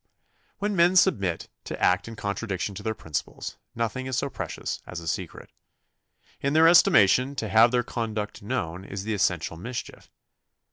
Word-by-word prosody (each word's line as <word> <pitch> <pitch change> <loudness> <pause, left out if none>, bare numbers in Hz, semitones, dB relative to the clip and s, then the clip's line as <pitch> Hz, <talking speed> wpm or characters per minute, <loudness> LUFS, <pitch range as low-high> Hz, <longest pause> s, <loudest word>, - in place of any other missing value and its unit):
When 205 0 -1
men 175 +1 +4
submit 100 - +2 0.2
to - - -6
act 90 - +2
in 115 - -7
contradiction 100 -2 -3
to 95 - -7
their 110 +1 -2
principles, 80 -7 -5 0.2
nothing 115 +3 -2
is 130 -2 -2
so 140 - -1
precious 85 -6 -5
as 90 - -6
a 85 - -9
secret. - - -4 0.9
In 140 +1 -1
their 160 +1 +6
estimation, 130 - +5
to 115 - -3
have 110 +3 +6
their 120 0 +1
conduct 110 -3 -4
known 100 -6 -3
is 100 0 -6
the 110 +1 -2
essential 90 -5 0
mischief. 120 +8 -7
110 Hz, 160 wpm, -26 LUFS, 95-130 Hz, 0.9 s, their